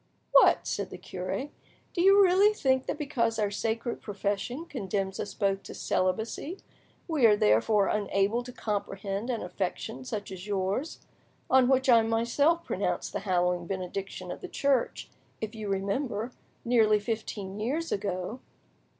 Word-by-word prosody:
"What!" - - +6
said - - -2
the - - -8
cure, 185 +10 -4 0.4
"do 345 - 0
you 395 +2 +7
really 390 +3 +5
think 260 -6 +1
that - - -2
because 240 -7 0
our 210 -2 0
sacred 225 +3 -2
profession 205 - -3
condemns 195 - -3
us 205 - -4
both 195 -2 +1
to - - -10
celibacy, 220 - -1 0.5
we 300 -8 +4
are 210 -1 +5
therefore 195 - +4
unable 205 +2 +1
to 250 0 -9
comprehend 200 0 -3
an 235 -3 -1
affection 175 -8 -4
such 205 +11 -5
as 190 +1 -8
yours, 200 - -2 0.5
on 260 -1 +6
which 265 0 +3
I 235 -3 +7
myself 235 +9 +2
pronounced - - -2
the - - -1
hallowing 180 -2 0
benediction 190 +1 -4
of - - -7
the - - -6
Church—if 250 -4 -2
you 215 -2 -5
remember—nearly 215 +1 0
fifteen 205 -2 -4
years 295 +10 -2
ago?" 195 +3 -2
215 Hz, 140 wpm, -29 LUFS, 195-255 Hz, 0.5 s, you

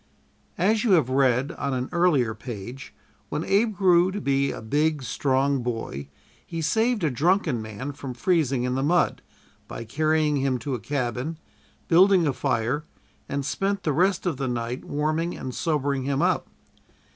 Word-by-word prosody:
As 210 +5 +2
you 225 -5 +3
have 145 -8 +3
read 130 +1 +2
on 140 -2 -1
an 125 0 -2
earlier 165 -10 +2
page, 120 +3 -8 0.4
when 150 +2 -2
Abe 215 +3 +2
grew 180 -1 +4
to 205 - -3
be 140 -4 +1
a - - -6
big, 145 +6 0
strong 135 +1 +1
boy 115 - -4 0.4
he 165 - -6
saved 220 +6 +1
a 155 - +2
drunken 155 - +1
man 110 +6 -6
from 130 -2 -7
freezing 140 -3 +1
in 125 0 -1
the 130 - 0
mud, 170 +5 +2 0.5
by - - -6
carrying 155 +4 +1
him 135 -1 +1
to 130 +3 -4
a 125 - -2
cabin, 125 +5 -3 0.5
building 185 +1 +5
a 145 - +1
fire, 125 +5 -1 0.5
and 140 -1 -2
spent 195 +8 -1
the 150 - +1
rest 185 +4 +2
of 170 -7 -1
the 135 - -2
night 120 +1 -3
warming 155 +4 -1
and 130 - -5
sobering 140 -4 -1
him 140 0 0
up. - - +1
140 Hz, 170 wpm, -25 LUFS, 125-170 Hz, 0.5 s, building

